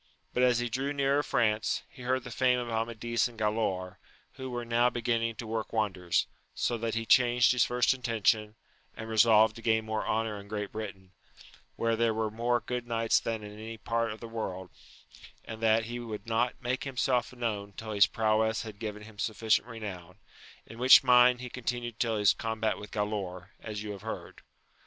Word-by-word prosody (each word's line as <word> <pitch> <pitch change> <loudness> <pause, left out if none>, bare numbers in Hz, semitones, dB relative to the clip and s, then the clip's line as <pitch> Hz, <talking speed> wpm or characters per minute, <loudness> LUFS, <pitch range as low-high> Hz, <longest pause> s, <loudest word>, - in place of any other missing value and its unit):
But 125 - +1
as 125 -2 +4
he 120 0 -1
drew 135 +4 -2
nearer 140 0 +2
France, 110 -6 0
he - - -15
heard 130 +1 0
the 125 - -8
fame 125 +1 +2
of 120 -1 -4
Amadis 115 +1 -1
and 120 -2 -14
Galaor, 105 -4 -1 0.4
who 130 -1 -7
were 120 -1 -4
now 120 +1 +3
beginning 115 -1 -1
to 115 - -7
work 110 0 -3
wonders, 95 -6 0 0.3
so 120 - 0
that 115 0 -2
he 115 0 -2
changed 120 0 +5
his 125 -2 +3
first 125 +2 +2
intention, 110 -3 0 0.4
and 110 - -6
resolved 110 0 +5
to - - -9
gain 110 -1 +1
more 110 0 -2
honour 110 -1 -1
in 100 - -12
Great 105 -1 -4
Britain, 100 -4 -7 0.6
where 115 0 +1
there 115 -1 +1
were 110 -1 -1
more 120 +2 0
good 125 -1 -4
knights 115 -1 +2
than 110 -2 -3
in 105 0 -9
any 110 +2 -8
part 115 0 -1
of 110 - -8
the 115 - -6
world, 95 -5 -5 0.7
and 110 0 -8
that 110 0 +3
he 120 +1 -5
would 115 -3 -6
not 115 +2 0
make 130 0 -2
himself 130 -2 0
known 110 -5 -3
till 110 +2 -7
his 100 -1 +5
prowess 110 0 +1
had 110 -2 -9
given 105 -1 -5
him 105 -1 -14
sufficient 110 +2 +1
renown; 95 -6 -8 0.5
in 115 - -12
which 130 +2 +8
mind 125 -1 +6
he 125 - -5
con 125 - -8
tinued 120 -1 -3
till 115 -2 +1
his 105 -1 +5
combat 110 -1 -2
with 105 - -9
Galaor, 100 -4 -3
as 105 -2 -5
you 105 - -5
have 100 -2 -8
heard. - - -7
115 Hz, 195 wpm, -29 LUFS, 110-120 Hz, 0.7 s, which